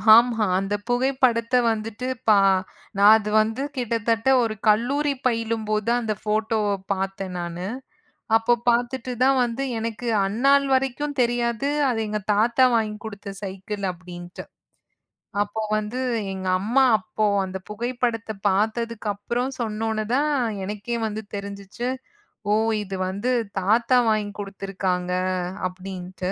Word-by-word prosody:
ஆமா, 230 -2 +4
அந்த 195 +1 -2 0.2
புகைப்படத்த 245 -1 +2 0.2
வந்துட்டு 225 +3 -4 0.2
பா 210 -2 +7 0.6
நான் 205 +2 +8
அது 210 -1 -4
வந்து 225 +5 -2
கிட்டத்தட்ட 230 -1 0
ஒரு 225 -2 -1
கல்லூரி 275 +7 +3
பயிலும் 230 -2 0
போதுதான் 220 +3 +1
அந்த 220 -2 -1
ஃபோட்டோவ 215 0 0 0.2
பாத்தேன் 195 -1 -3
நானு. 175 +1 -4 0.7
அப்பப் 235 +1 +1
பாத்துட்டு 245 +1 +1
தான் 265 +1 +4
வந்து 240 +3 -3 0.2
எனக்கு 230 +1 -4 0.2
அந்நாள் 275 +7 +3
வரைக்கும் 270 +2 -1
தெரியாது. 240 +2 +1 0.2
அது 235 -3 0
எங்க 210 0 -2
தாத்தா 235 +5 +4
வாங்கி 215 -2 0
குடுத்த 205 -2 -7
சைக்கிள் 195 +1 -5
அப்படின்ட்டு. 175 0 -10 1.0
அப்போ 205 +2 -2 0.2
வந்து 215 +4 -3 0.3
எங்க 190 0 -5
அம்மா 235 +8 +3
அப்போ 215 0 -2 0.2
அந்தப் 190 0 -7
புகைப்படத்த 235 0 -2 0.2
பாத்ததுக்கு 220 +3 -1
அப்புறம் 240 +6 -2
சொன்னவுனே 220 -1 -2
தான் 295 +3 +2 0.4
எனக்கே 210 +4 -3
வந்து 215 0 -4
தெரிஞ்சுச்சு. 200 +3 -5 0.6
ஓ! - - +5 0.3
இது 195 -1 -6
வந்து 200 +7 -1 0.3
தாத்தா 230 +6 +3
வாங்கி 210 -1 0
குடுத்திருக்காங்க 195 -2 -3 0.6
அப்படின்ட்டு. 185 0 -6
220 Hz, 120 wpm, -24 LUFS, 200-240 Hz, 1.0 s, நான்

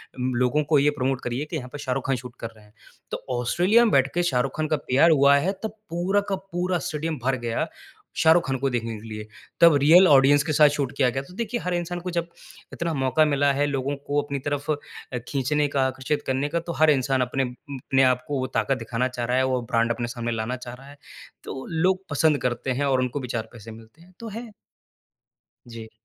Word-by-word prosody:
अम, 130 0 -2
लोगों 125 +5 +2
को 150 - +6
ये 145 +2 +4
प्रोमोट 135 -2 -2
करिए 125 +4 -3
कि - - -3
यहाँ 125 - -7
पे - - -5
शाहरुख 135 -3 -3
खान 135 - +2
शूट 125 -1 -10
कर 115 - -4
रहे 110 - -18
हैं।" 105 - -23 0.4
तो - - -2 0.2
ऑस्ट्रेलिया 185 - +3
में 220 - +1
बैठके 140 +6 +2
शाहरुख 130 -4 0
खान 155 0 0
का 155 0 +1
पीआर 145 +6 +5
हुआ 140 -1 +5
है, 175 +7 +1
तब 220 - -2 0.2
पूरा 180 +4 +1
का 195 - +1
पूरा 185 -1 -2
स्टेडियम 155 +1 -3
भर 135 0 +1
गया 115 -1 -1 0.5
शाहरुख 165 -1 +4
खान 135 - -1
को 135 +1 0
देखने 115 -2 -3
के 115 - -11
लिए। 110 -1 -7 0.3
तब 170 -3 +8
रियल 170 +6 +7
ऑडियंस 140 -1 +5
के 155 0 -2
साथ 150 0 +6
शूट 140 -3 -1
किया 130 -3 +3
गया। 135 +2 -3
तो 180 - -15
देखिए, 235 +1 -3
हर 180 -3 -3
इंसान 175 0 -3
को 180 +1 -5
जब 170 0 -2 0.4
इतना 170 -1 -2
मौका 135 +2 +2
मिला 145 -1 +2
है 145 +1 +1
लोगों 140 0 -2
को 145 +1 +1
अपनी 140 -1 -4
तरफ़ 145 +1 -2
अ, 145 -3 -6
खींचने 145 +2 0
का, 135 -2 0
आकर्षित 130 +3 -2
करने 135 +2 0
का, 170 - 0
तो 170 0 -6
हर 155 - +6
इंसान 135 -1 +1
अपने 125 +2 0
उ, 125 - -2 0.3
अपने 135 +1 +1
आपको 130 +2 +1
वो 130 - -2
ताक़त 135 - +1
दिखाना 120 +1 -2
चाह 125 -2 -4
रहा 125 +2 0
है, 130 - +3
वो 130 -1 0
ब्रांड 115 0 +2
अपने 120 0 -4
सामने 120 -1 -3
लाना 115 +2 -2
चाह 120 - -7
रहा 135 +2 -13
है। 145 - -14 0.5
तो 130 - -7
लोग 185 +3 +1
पसंद 150 0 +2
करते 125 +1 -2
हैं 145 - +2
और 130 -2 +2
उनको 125 +2 -2
भी 130 - -6
चार 115 -2 -4
पैसे 115 -1 -11
मिलते 115 +7 -15
हैं, 180 +2 -19
तो 230 - -7
है। 230 +2 -7 1.2
जी। 115 -1 -9
140 Hz, 235 wpm, -24 LUFS, 125-160 Hz, 1.2 s, तब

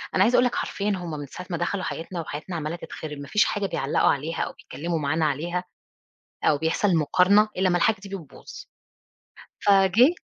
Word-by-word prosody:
أنا 190 - +5
عايزة 240 +4 +3
أقول 250 - +5
لك 245 - 0
حرفيًا 205 +1 -2
هُم 175 -3 -6
من 145 -1 -5
ساعة 180 +6 -9
ما 170 - -2
دخلوا 185 +3 -2
حياتنا 170 +1 -4
وحياتنا 160 +4 -6
عمالة 155 +1 -3
تتخرب، 155 -3 -7
ما 140 0 -8
فيش 210 - +3
حاجة 205 -1 -1
بيعلقوا 140 -6 +1
عليها 155 +4 -1
أو - - -2
بيتكلموا 165 +1 -4
معانا 155 +2 0
عليها. 170 +5 -1 0.8
أو 145 - +4
بيحصل 165 +4 +1
مقارنة 185 +7 +4
إلا 185 0 +2
ما 175 - +2
الحاجة 220 +4 +3
دي 200 - -8
بتبوظ، 185 -8 -9 1.0
فجِه 200 - +5
175 Hz, 185 wpm, -25 LUFS, 155-195 Hz, 1.0 s, أنا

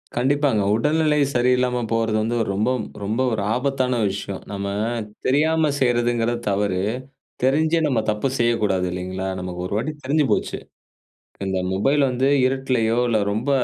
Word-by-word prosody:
கண்டிப்பாங்க. 135 -2 +2
உடல்நிலை 150 +5 +2 0.2
சரியில்லாம 125 0 +2
போறது 115 -1 +1
வந்து 115 +2 -1 0.2
ரொம்ப 105 +5 +1 0.3
ரொம்ப 110 +5 -1
ஒரு 110 -2 -1
ஆபத்தான 130 -1 0
விஷயம். 100 0 -5
நம்ம 100 -1 -3 0.6
தெரியாம 155 +3 +2
செய்றதுங்குறது 120 -1 +1
தவறு. 100 -2 0 0.6
தெரிஞ்சே 155 +5 +3
நம்ம 130 -6 +1
தப்பு 105 +5 0
செய்யக்கூடாது 105 -6 +1
இல்லைங்களா? 95 +1 -4
நமக்கு 90 -1 -6
ஒரு 90 - -4
வாட்டி 130 +8 -1
தெரிஞ்சு 150 +3 +2
போச்சு. - - 0 0.9
இந்த 95 -1 -1
மொபைல் 135 +10 +2
வந்து 130 +1 0 0.2
இருட்டுலையோ, 130 -4 0
இல்லை 110 -2 +2
ரொம்ப 115 +7 -2
120 Hz, 130 wpm, -22 LUFS, 105-135 Hz, 0.9 s, தெரிஞ்சே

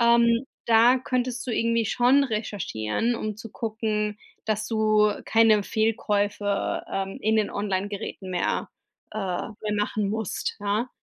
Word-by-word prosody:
Ähm, 235 +1 +4 0.2
da 235 +3 +6
könntest 250 0 -2
du - - -2
irgendwie 230 0 +1
schon 250 +6 +4
recherchieren, 215 - -2
um 215 -2 -4
zu 225 0 -9
gucken, 215 -2 -2 0.3
dass 215 -1 -1
du 215 -1 +3
keine 220 -2 +4
Fehlkäufe, 205 -2 0
ähm, 195 0 -3
in 220 +1 +2
den 215 -2 +1
Online-Geräten 200 -1 -3
mehr 180 -1 -1 0.4
äh, 215 - -4
mehr 210 +2 -3
machen 210 0 0
musst, 220 0 -3
ja. 205 +4 0
215 Hz, 130 wpm, -25 LUFS, 205-230 Hz, 0.4 s, da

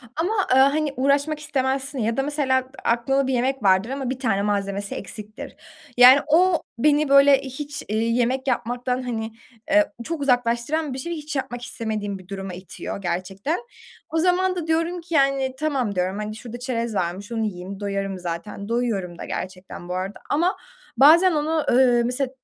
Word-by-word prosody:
ama, 350 +7 0 0.2
ııı, 265 - +7
hani 295 -1 -1
uğraşmak 280 +3 +1
istemezsin 270 -1 -2
ya 225 +2 -1
da 270 - +1
mesela 280 -3 +1 0.2
a - - +2
aklında 265 +3 +1
bir 265 - 0
yemek 260 0 0
vardır 190 +4 +3
ama 270 -2 -3
1 260 - -4
tane 220 -7 +1
malzemesi 200 -1 -2
eksiktir. 215 +7 -8 0.4
Yani 250 +3 +9
o 345 +2 +4 0.2
beni 295 +2 +3
böyle 275 0 +7
hiç, 285 +2 -6
iii, 225 +3 0
yemek 260 +3 0
yapmaktan, 245 +1 -1
hani, 225 -2 -3 0.4
eee, 310 0 +4
çok 320 0 -4
uzaklaştıran 250 +3 +1
bir 265 - -5
şey, 340 +6 -4
hiç 305 -1 -6
yapmak 245 -3 -3
istemediğim 215 -5 -4
bir 185 - -16
duruma 195 -2 -6
itiyor 185 +2 -7
gerçekten. 190 - -2 0.5
O 325 - -2
zaman 365 +2 +2
da 335 -2 -4
diyorum 330 +2 0
ki, 335 0 -9
yani 275 -3 +2
"Tamam." 265 -10 -1
diyorum, 185 +2 -1
hani, 215 0 -4
şurada 240 +1 -8
çerez 235 -3 -3
varmış, 190 +5 -3
onu 225 -1 -1
yiyeyim, 190 0 -6
doyarım 195 -1 -3
zaten, 180 +4 -6
doyuyorum 210 -8 -1
da - - -7
gerçekten 185 -1 -7
bu 180 - -2
arada 190 +2 -4
ama 345 +6 +1 0.4
bazen 330 +8 +7
onu, 310 0 0
ııı, 245 -1 +5
mesela 250 +2 -1
250 Hz, 175 wpm, -23 LUFS, 205-290 Hz, 0.5 s, Yani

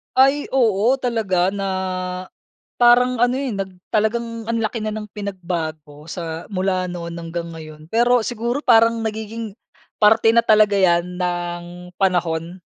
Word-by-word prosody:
Ay, 275 +2 +4
oo, 230 -3 +3
talaga 215 -8 0
na, 195 -1 -2 1.1
parang 245 +1 +5
ano 245 +1 +3
eh, 270 0 -2
nag 195 -3 -4 0.2
talagang 230 +1 -1
ang 230 0 -1
laki 220 +2 -2
na 215 -1 -3
ng 210 -1 -7
pinagbago 165 -7 -5
sa 165 -1 -6
mula 185 -2 -1
noon 170 -1 -6
hanggang 170 0 -5
ngayon. 155 -1 -11
Pero 240 +1 +3
siguro 240 +4 -2
parang 230 -1 +4
nagiging 220 0 -4 0.5
parte 220 +1 +5
na 230 - +3
talaga 215 -2 +4
yan 180 -1 +2
ng 175 0 -4
panahon 175 -2 0
205 Hz, 135 wpm, -21 LUFS, 175-230 Hz, 1.1 s, parang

